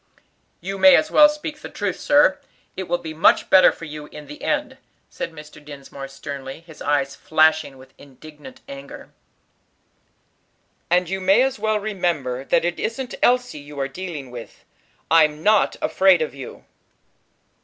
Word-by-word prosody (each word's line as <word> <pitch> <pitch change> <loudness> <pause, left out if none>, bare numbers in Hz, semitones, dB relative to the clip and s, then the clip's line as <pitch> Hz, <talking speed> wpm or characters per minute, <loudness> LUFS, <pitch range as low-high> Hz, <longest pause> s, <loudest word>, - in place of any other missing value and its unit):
"You 195 +2 -5
may 280 +5 +8
as 310 - +1
well 300 0 +7
speak 300 0 -6
the - - -9
truth, - - -4
sir; 290 -10 +3 0.4
it 190 -1 -5
will 175 - 0
be 165 -2 -8
much 160 - +3
better 190 - +7
for 165 - -10
you 150 -1 -9
in 150 0 -11
the 150 +1 -12
end," - - -2 0.3
said - - -5
Mr. 150 -1 -13
Dinsmore, 140 -1 -10
sternly, 135 +1 -8
his 165 -2 -16
eyes 140 -1 0
flashing 155 -3 +1
with 130 0 -17
indignant 150 - -14
anger. 275 0 -11 1.8
"And 180 0 +2
you 190 +2 -4
may 195 +6 +4
as 265 0 -2
well 215 -1 0
remember 170 -11 -2
that 165 - +1
it 175 0 -2
isn't 245 +3 -4
Elsie 245 -9 +2
you 145 0 -11
are 135 - -1
dealing 150 -4 -7
with. 120 -2 -11 0.5
I'm 155 -1 +3
not 210 +1 +3
afraid 190 -4 +4
of 155 - -6
you." 135 -2 -10
160 Hz, 160 wpm, -21 LUFS, 145-195 Hz, 1.8 s, may